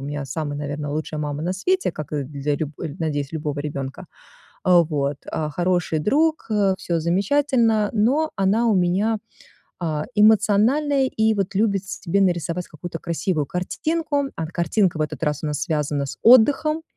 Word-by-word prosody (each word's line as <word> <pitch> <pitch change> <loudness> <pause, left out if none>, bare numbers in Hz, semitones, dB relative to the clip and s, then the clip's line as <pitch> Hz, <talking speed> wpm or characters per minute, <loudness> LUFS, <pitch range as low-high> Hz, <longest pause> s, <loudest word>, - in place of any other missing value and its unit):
меня 145 0 -4
самая, 145 +2 -4
наверное, 145 0 -4
лучшая 155 0 -3
мама 145 0 -3
на 180 +2 -1
свете, 365 - 0
как, 155 -1 -7
э, 145 -2 -1
для 145 +1 -2
любо 155 0 -4 0.3
надеюсь, 145 -3 -2
любого 150 -2 -3
ребёнка. 140 -3 -5 0.6
А 180 -1 +6
вот, 145 -3 -1
а, 155 -1 -2
хороший 175 -1 0
друг, 310 - +1
э, 200 -3 +2
всё 170 -1 -2
замечательно, 220 - +2
но 270 +9 +2
она 205 +4 +2
у 215 - +3
меня, 195 +5 +1 0.6
э, 155 -2 -1
эмоциональная 220 +7 +4
и 220 0 +3
вот 195 -1 -2
любит 200 -2 +1
себе 195 0 -2
нарисовать 175 -1 0
какую-то 165 +1 -7
красивую 170 -1 -1
картинку. 290 - -2
А 165 - -3
картинка 170 +1 0
в - - -4
этот 150 +2 -3
раз 150 0 -1
у - - 0
нас 150 -1 -2
связана 150 -4 -1
с - - -7
отдыхом. 280 +7 +5
175 Hz, 165 wpm, -22 LUFS, 150-220 Hz, 0.6 s, А